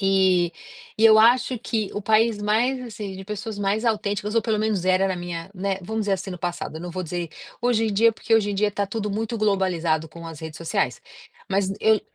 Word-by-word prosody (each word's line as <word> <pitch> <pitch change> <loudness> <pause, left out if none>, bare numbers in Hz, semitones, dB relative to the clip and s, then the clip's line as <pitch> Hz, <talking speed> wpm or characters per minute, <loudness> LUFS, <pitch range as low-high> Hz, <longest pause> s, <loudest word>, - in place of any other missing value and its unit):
Eh, 190 -2 +3 0.5
e 220 - +3
eu 220 -1 +8
acho 250 +3 +4
que, 220 -3 -2
o 205 - -3
país 220 +1 +3
mais, 235 +5 +1
assim, 210 -5 -6
de 190 - -8
pessoas 210 +2 -5
mais 205 +3 0
autênticas, 210 -1 -1
ou 230 - +3
pelo 220 -2 0
menos 210 -4 0
era 185 +1 +3
na 190 - 0
minha 175 -1 -5
né, 195 0 -1
vamos 220 +4 -2
dizer, 205 -1 0
assim, 195 0 -2
no 180 - -6
passado. 170 -2 -4
Não 175 - -6
vou 185 +2 -4
dizer: 175 0 -4 0.3
"Hoje 240 -2 +2
em 220 - 0
dia", 225 +3 +4
porque 225 +1 0
hoje 210 -2 +3
em - - -2
dia 205 +1 +2
tá 200 0 -1
tudo 210 +1 -3
muito 225 +3 -2
globalizado 180 -6 +1
com 170 +2 -10
as 160 -2 -9
redes 160 -1 -7
sociais, 165 - -1 0.5
mas 195 0 +1
eu 220 -1 +4
200 Hz, 220 wpm, -24 LUFS, 185-220 Hz, 0.5 s, eu